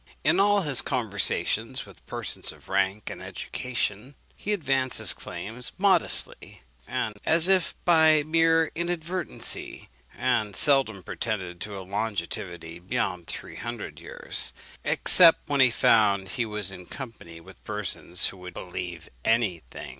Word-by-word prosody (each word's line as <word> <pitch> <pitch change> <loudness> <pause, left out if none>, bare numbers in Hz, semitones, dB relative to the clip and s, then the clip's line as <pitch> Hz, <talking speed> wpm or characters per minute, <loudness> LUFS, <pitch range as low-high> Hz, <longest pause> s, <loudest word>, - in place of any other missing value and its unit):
In - - +3
all 205 0 +4
his 145 -7 -2
conversations 115 -7 0
with - - -17
persons - - -2
of - - -17
rank 100 +2 0
and - - -8
education, 125 +1 -5 0.2
he 210 - -5
advanced 135 -9 0
his - - +7
claims 115 +4 -7
modestly, 190 - 0 0.2
and 105 -1 -3
as 165 +2 +4
if 190 -3 +2
by 160 -3 +5
mere 165 +1 +3
inadvertency, 175 +1 -3 0.3
and 105 -2 0
seldom 135 -9 +4
pretended 95 -3 -4
to 105 -1 -5
a 95 - -8
longevity 90 -4 -4
beyond 90 -3 -3
three - - -7
hundred - - -6
years, - - -3 0.3
except 170 -3 +6
when 145 -2 0
he 130 - +7
found 100 -4 +3
he 115 +4 -2
was 105 -3 -3
in 90 -1 -11
company 110 -11 -9
with 95 +2 -16
persons 105 -4 0
who 95 - -12
would 90 -1 -10
believe 90 -2 -7 0.2
any 110 -6 +1
thing. - - -9
110 Hz, 140 wpm, -26 LUFS, 95-155 Hz, 0.3 s, his